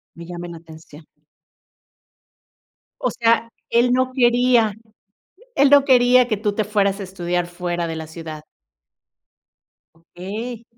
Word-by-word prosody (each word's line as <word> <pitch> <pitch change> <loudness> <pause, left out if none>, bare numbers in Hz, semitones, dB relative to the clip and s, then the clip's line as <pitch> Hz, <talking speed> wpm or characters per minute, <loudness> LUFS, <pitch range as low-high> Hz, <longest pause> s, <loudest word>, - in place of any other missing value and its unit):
Me 170 0 -10
llamen 175 0 -7
la 165 - -9
atención. 160 -1 -15 2.0
O - - 0
sea, 230 -1 +1 0.2
él 240 +1 +3
no 255 0 +1
quería. 240 -3 +3 0.8
Él 280 0 +4
no 285 -1 +6
quería 250 -1 +5
que 215 - 0
tú 210 0 -1
te 215 - -1
fueras 200 -1 0
a - - -4
estudiar 175 -2 -3
fuera 175 -1 -4
de 165 -1 -5
la 160 0 -6
ciudad. 160 -1 -9 1.5
Okey. 210 +8 -8
205 Hz, 130 wpm, -21 LUFS, 170-240 Hz, 2.0 s, no